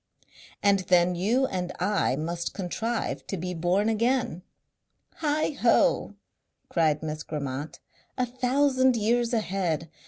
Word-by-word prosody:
"And 200 Hz, -1 st, +4 dB
then 180 Hz, 0 st, +4 dB
you 220 Hz, +10 st, +1 dB
and 180 Hz, -6 st, -3 dB
I 200 Hz, -8 st, +1 dB
must 170 Hz, +4 st, -3 dB
contrive 220 Hz, +5 st, -3 dB
to 195 Hz, -, -3 dB
be 180 Hz, +2 st, -4 dB
born 180 Hz, +5 st, +1 dB
again." 225 Hz, -4 st, 0 dB, 0.8 s
"Heighho!" 295 Hz, -5 st, +2 dB, 0.5 s
cried 155 Hz, -3 st, +1 dB
Miss 155 Hz, 0 st, -4 dB
Grammont. 145 Hz, -1 st, -5 dB, 0.4 s
"A 255 Hz, -, +1 dB
thousand 260 Hz, +1 st, +2 dB
years 235 Hz, +2 st, +1 dB
ahead! 180 Hz, -, -1 dB
195 Hz, 115 wpm, -27 LUFS, 170-240 Hz, 0.8 s, And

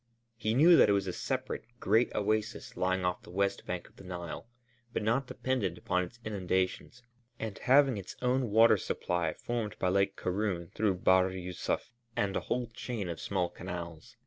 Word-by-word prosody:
He 110 Hz, -1 st, -1 dB
knew 165 Hz, +5 st, +8 dB
that -, -, +7 dB
it -, -, +5 dB
was 100 Hz, -1 st, +1 dB
a 90 Hz, -, -3 dB
separate, -, -, -3 dB, 0.2 s
great 110 Hz, +5 st, +3 dB
oasis 110 Hz, +2 st, -1 dB
lying 95 Hz, 0 st, 0 dB
off 90 Hz, 0 st, 0 dB
the -, -, -15 dB
west 100 Hz, +2 st, -1 dB
bank 90 Hz, -1 st, -4 dB
of -, -, -24 dB
the -, -, -12 dB
Nile 90 Hz, +2 st, -6 dB, 0.4 s
but -, -, -2 dB
not 120 Hz, +5 st, +1 dB
dependent 125 Hz, -12 st, -1 dB
upon 90 Hz, +1 st, 0 dB
its 90 Hz, +6 st, -9 dB
inundations 95 Hz, +3 st, -1 dB, 0.3 s
and 110 Hz, -3 st, -4 dB
having 135 Hz, -2 st, +5 dB
its 95 Hz, -2 st, -7 dB
water 115 Hz, -3 st, +4 dB
system 85 Hz, -3 st, -1 dB
formed 115 Hz, -4 st, -3 dB
by 90 Hz, -, +1 dB
Lake 100 Hz, +1 st, +2 dB
Karûn 90 Hz, -3 st, -2 dB
through 105 Hz, -3 st, +1 dB
Bahr 95 Hz, +1 st, +4 dB
Yûsuf 90 Hz, +4 st, -3 dB, 0.2 s
and 100 Hz, -1 st, 0 dB
a -, -, +2 dB
whole 125 Hz, 0 st, -1 dB
chain 115 Hz, -4 st, -5 dB
of 85 Hz, -, -5 dB
small 90 Hz, -3 st, 0 dB
canals. 85 Hz, -3 st, -7 dB
100 Hz, 175 wpm, -31 LUFS, 90-115 Hz, 0.4 s, knew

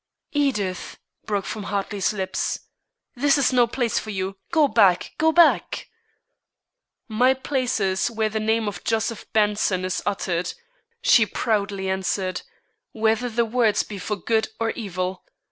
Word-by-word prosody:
"Edith!" 210 Hz, -11 st, -1 dB, 0.3 s
broke 205 Hz, -2 st, -1 dB
from 210 Hz, -2 st, -5 dB
Hartley's 200 Hz, -1 st, -1 dB
lips. 190 Hz, -3 st, -2 dB, 0.5 s
"This 280 Hz, +3 st, +3 dB
is 275 Hz, -2 st, +2 dB
no 245 Hz, -2 st, +5 dB
place 235 Hz, -1 st, 0 dB
for 220 Hz, -, -8 dB
you! 190 Hz, -1 st, -3 dB, 0.2 s
Go 315 Hz, -3 st, +4 dB
back! 200 Hz, -7 st, +3 dB
go 320 Hz, +1 st, +4 dB
back!" 340 Hz, +1 st, +3 dB, 1.2 s
"My 250 Hz, +3 st, +3 dB
place 260 Hz, -2 st, -1 dB
is 190 Hz, +1 st, +1 dB
where 220 Hz, -2 st, 0 dB
the 220 Hz, 0 st, -2 dB
name 220 Hz, 0 st, +1 dB
of 200 Hz, -3 st, -5 dB
Joseph 225 Hz, 0 st, -2 dB
Benson 205 Hz, -3 st, +1 dB
is 185 Hz, -, -2 dB
uttered," 180 Hz, -3 st, -1 dB, 0.5 s
she 240 Hz, -, +5 dB
proudly 200 Hz, -4 st, -1 dB
answered, 190 Hz, -1 st, -1 dB, 0.5 s
"whether 225 Hz, +2 st, +1 dB
the 235 Hz, +1 st, +1 dB
words 225 Hz, -2 st, +2 dB
be 205 Hz, -2 st, -8 dB
for 210 Hz, +3 st, -2 dB
good 220 Hz, +3 st, 0 dB
or 225 Hz, 0 st, 0 dB
evil. 185 Hz, -4 st, -4 dB
215 Hz, 145 wpm, -23 LUFS, 195-240 Hz, 1.2 s, no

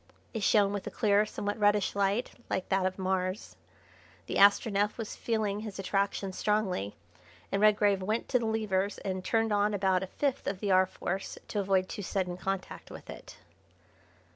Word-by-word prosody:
It 225 Hz, -, -3 dB
shone 200 Hz, 0 st, +4 dB
with 200 Hz, -2 st, -4 dB
a -, -, -1 dB
clear, 210 Hz, -2 st, +2 dB
somewhat 205 Hz, +1 st, -4 dB
reddish 205 Hz, -1 st, +2 dB
light 200 Hz, +4 st, +1 dB, 0.2 s
like 190 Hz, -, -2 dB
that 190 Hz, -1 st, +2 dB
of 185 Hz, -, -5 dB
Mars. 185 Hz, +1 st, -2 dB, 0.7 s
The -, -, -2 dB
Astronef 205 Hz, +1 st, +4 dB
was 225 Hz, -3 st, -5 dB
feeling 215 Hz, -3 st, -1 dB
his 215 Hz, -2 st, -7 dB
attraction 195 Hz, 0 st, -1 dB
strongly, 190 Hz, -, -1 dB, 0.6 s
and 195 Hz, -, 0 dB
Redgrave 205 Hz, -2 st, +4 dB
went 215 Hz, +5 st, -1 dB
to 250 Hz, -, +3 dB
the 230 Hz, -, -2 dB
levers 205 Hz, -3 st, 0 dB
and 185 Hz, -1 st, -4 dB
turned 225 Hz, +1 st, +1 dB
on 205 Hz, 0 st, +2 dB
about 190 Hz, -2 st, +2 dB
a 190 Hz, -, -4 dB
fifth 275 Hz, +6 st, -2 dB
of 185 Hz, -, -2 dB
the 205 Hz, -1 st, -1 dB
R. 185 Hz, 0 st, +5 dB
Force 190 Hz, +1 st, -4 dB
to 210 Hz, -, -1 dB
avoid 190 Hz, -1 st, +2 dB
too 205 Hz, -, -6 dB
sudden 185 Hz, -2 st, -2 dB
contact 190 Hz, +1 st, -4 dB
with -, -, -9 dB
it. -, -, -11 dB
200 Hz, 175 wpm, -30 LUFS, 190-210 Hz, 0.7 s, R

